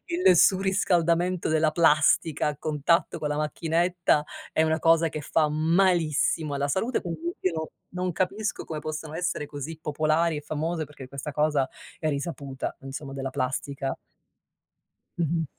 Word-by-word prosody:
il 345 - +4
surriscaldamento 180 -2 +3
della 155 0 +3
plastica 155 -1 +3
a 150 - -3
contatto 155 +3 +1
con 150 - -1
la 150 - -1
macchinetta 165 +1 +1 0.3
è 160 - +3
una 160 0 +1
cosa 165 0 +4
che 155 -1 -5
fa 155 +1 +2
malissimo 160 -1 +2
alla 140 0 0
salute, 225 - 0
quindi, 175 - -5 0.2
io 185 - +1
non 160 0 -2 0.3
non 180 0 -1
capisco 200 +5 -2
come 155 -2 -5
possano 155 0 -5
essere 175 -3 -2
così 150 +2 -7
popolari 155 +2 +1
e - - -3
famose 155 +2 -2
perché 145 -3 -11
questa 140 +2 -6
cosa 150 -3 +1 0.3
è 155 - 0
risaputa, 140 -2 -4
insomma, 135 +1 -7
della 135 -1 -4
plastica. 135 +1 -2 1.2
Mh-mh. 165 -1 0
155 Hz, 145 wpm, -26 LUFS, 150-170 Hz, 1.2 s, il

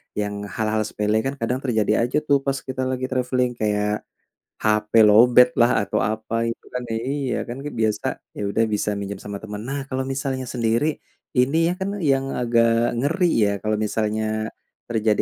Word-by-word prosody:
Yang 105 0 -2 0.2
hal-hal 110 0 0
sepele 105 +1 0
kan 135 - -1
kadang 120 +3 0
terjadi 110 -3 +2
aja 140 - 0
tuh 140 -1 +4
pas 135 -1 +1
kita 130 0 -4
lagi 130 0 -2
traveling, 125 -1 +1
kayak 105 -1 0 0.6
HP 105 0 +1
lowbat 120 +4 +7
lah 120 -2 +4
atau 100 - -1
apa 110 +2 -1
gitu 115 - -5
kan 125 0 -3
iya, 130 +3 -2
kan 120 +2 -6
kan 145 +1 -6
biasa, 110 -1 0 0.3
ya - - -3
udah 105 +3 +1
bisa 105 0 0
minjem 100 -1 -5
sama 100 0 -6
teman. 105 -1 -6
Nah 140 0 -3
kalau 130 0 -1
misalnya 135 -1 -3
sendiri, 120 +5 0 0.4
ini 150 +7 +3
ya 175 - +1
kan 200 +2 -3
yang 135 -4 +1
agak 115 -1 +2
ngeri 160 +9 +1 0.2
ya, 100 - +3
kalau 110 +1 0
misalnya 110 0 -1 0.6
terjadi 110 -2 +1
115 Hz, 175 wpm, -23 LUFS, 110-130 Hz, 0.6 s, lowbat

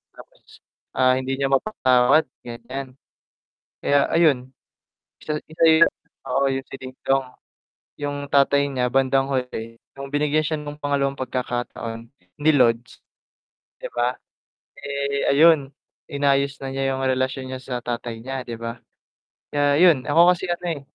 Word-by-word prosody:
Tapos. - - -17 0.5
Ah, 130 0 +4
hindi 130 +1 -2
niya 135 - +1
mapatawad 135 -3 +3 0.2
ganyan. 125 +3 -7 0.9
Kaya 145 0 +3
ayun 135 -6 +2 0.7
isa 150 0 -2
isa 160 +1 +5 0.4
oo, 135 +2 +1
yung 135 0 -3
si - - -11
Dingdong, 130 +1 -2 0.8
yung 145 0 -3
tatay 140 0 +3
niya 125 -2 -1
bandang 135 +1 +2
huli, 125 -3 -4 0.2
nung 140 0 -7
binigyan 150 +1 +1
siya 155 -1 -1
ng 150 0 -8
pangalawang 140 -1 0
pagkakataon 120 -2 -4 0.3
ni 155 +1 +5
Lods. 120 -2 +1 0.8
Di - - -5
ba? 120 +1 0 0.6
Eh, 140 0 -2
ayun 145 -2 +4 0.3
inayos 140 -1 0
na 135 - -4
niya 135 0 -1
yung 130 - -3
relasyon 130 0 -1
niya 130 0 -5
sa 125 -1 -5
tatay 120 -1 -5
niya, 130 +1 -5
di 120 - -6
ba? 115 +1 -5 0.7
Kaya 145 -1 +2
yun. 155 -7 +4
Ako 170 +4 +6
kasi 180 +1 -6
ano, 175 0 -3
eh, - - -16
135 Hz, 135 wpm, -23 LUFS, 130-145 Hz, 0.9 s, Ako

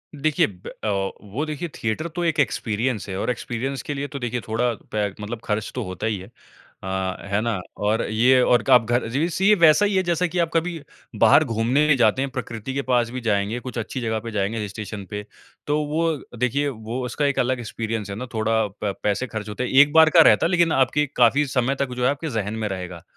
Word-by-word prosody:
देखिए 150 +1 +2
ब 90 -3 -13 0.2
अ, - - -1 0.4
वो 140 +10 -2
देखिए 155 +2 -4
थिएटर 115 +9 -2
तो 175 - -1
एक 165 -2 0
एक्सपीरियंस 115 -4 -1
है। 95 - -4
और - - -2
एक्सपीरियंस 125 +2 -4
के 145 - -4
लिए 140 0 -3
तो 140 -1 -7
देखिए 120 0 -3
थोड़ा 115 +2 0 0.2
पे 105 -1 0
मतलब 110 +2 -5
खर्च 105 -2 -2
तो - - -2
होता 95 +3 -5
ही 110 - -1
है। 95 0 -10 0.6
अ, 95 -1 -2
है 100 - +2
ना? 115 -4 -1 0.2
और 105 +2 +1
ये 125 +4 +4
और 120 -1 +3
क - - -2
आप 120 -3 +7
घर 120 +1 +1
ये 115 - -6
वैसे 185 +5 +3
वैसा 160 +5 +6
ही 200 -1 0
है 190 - +3
जैसा 175 0 +1
कि 175 +1 -3
आप 170 -1 +2
कभी 165 0 0 0.4
बाहर 155 - +6
घूमने 130 +4 +2
जाते 120 +2 +3
हैं, 140 - -1
प्रकृति 120 -1 -5
के 140 - -1
पास 125 -3 +1
भी 125 +1 -5
जाएँगे, 105 +1 0
कुछ 125 0 -7
अच्छी 115 +3 -4
जगह 110 -2 -1
पे 115 +1 -7
जाएँगे 105 +1 -1
हिल 105 - -3
स्टेशन 105 0 -7
पे। 105 -1 -5 0.4
तो 145 +1 +2
वो 160 +2 0 0.2
देखिए 130 +4 0
वो 115 +1 -5
उसका 145 +4 -1
एक 140 -1 +1
अलग 130 0 +1
एक्सपीरियंस 110 -2 -4
है 100 - -4
ना 125 +5 -5
थोड़ा 110 0 +1 0.2
प 100 - 0
पैसे 105 +5 0
खर्च 110 -3 -6
होते 105 +4 -3
हैं। 125 - -2
एक 145 +2 +6
बार 160 0 +7
का 165 0 +7
रहता - - +5
है - - +2
लेकिन 170 -2 +3
आपके 145 +3 +2
काफ़ी 130 +5 +4
समय 130 +1 0
तक 135 -2 -1
जो 125 - -2
है 125 - +4
आपके 150 +3 -4
ज़हन 110 -4 -2
में - - 0
रहेगा। 90 -3 -6
125 Hz, 235 wpm, -23 LUFS, 110-145 Hz, 0.6 s, आप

